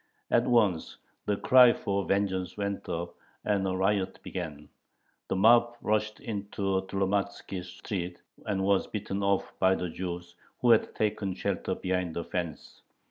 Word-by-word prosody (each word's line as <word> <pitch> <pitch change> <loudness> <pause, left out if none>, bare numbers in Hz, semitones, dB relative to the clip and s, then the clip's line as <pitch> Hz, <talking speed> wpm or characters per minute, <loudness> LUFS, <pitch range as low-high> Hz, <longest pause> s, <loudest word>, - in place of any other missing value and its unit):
At 120 - +3
once 105 -9 +2 0.3
the 105 - +1
cry 125 0 +7
for 100 0 -1
vengeance 95 -2 0
went 100 -1 -3
up, 85 +1 -3 0.3
and 100 -2 +1
a 95 - -1
riot 95 0 +1
began. 75 -5 -6 0.6
The - - -1
mob 120 +4 +5
rushed 105 -1 0
into 100 -2 -2
Tlomatzkie 100 -1 -1
Street, 90 0 -5 0.2
but 100 -2 -1
was 95 0 +2
beaten 100 -1 -3
off 100 -1 +1
by 95 0 +4
the 90 - -3
Jews, 85 0 -5 0.3
who 120 - +4
had 115 - +3
taken 100 -3 -1
shelter - - -2
behind 90 -3 -2
a 85 - -1
fence. 85 -4 -5
95 Hz, 145 wpm, -29 LUFS, 90-105 Hz, 0.6 s, cry